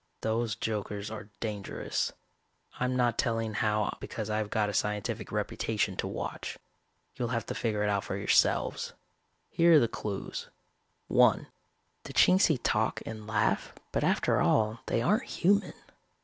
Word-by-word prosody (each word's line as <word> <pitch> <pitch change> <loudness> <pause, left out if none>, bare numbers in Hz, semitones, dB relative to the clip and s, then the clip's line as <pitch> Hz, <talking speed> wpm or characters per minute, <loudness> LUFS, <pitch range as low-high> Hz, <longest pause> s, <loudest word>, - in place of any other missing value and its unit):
Those 110 0 0
jokers 105 -1 -3
are 110 -1 -7
dangerous. 105 -3 -2 0.7
I'm 125 0 0
not 120 -2 +1
telling 115 -2 0
how 105 0 0
because 110 -1 -5
I've 105 -1 -1
got 105 -1 +1
a 105 - -3
scientific 105 -1 -2
reputation - - -1
to - - -1
watch. - - -5 0.6
You'll 120 - -2
have 115 -2 -2
to - - -4
figure 105 -3 -1
it 105 - +1
out 100 -1 0
for 95 - -3
yourselves. 100 - +2 0.6
Here 170 0 +5
are 155 - +9
the 115 - +3
clues: 100 -3 -5 0.6
(1) - - +4 0.6
The - - -7
Chingsi 180 -5 +5
talk 110 -1 +1
and 110 -1 -7
laugh 105 -1 0 0.2
but - - 0
after - - +2
all 110 +1 +2
they 115 - +1
aren't 210 - +2
human. 200 +3 +2
110 Hz, 150 wpm, -30 LUFS, 105-120 Hz, 0.7 s, are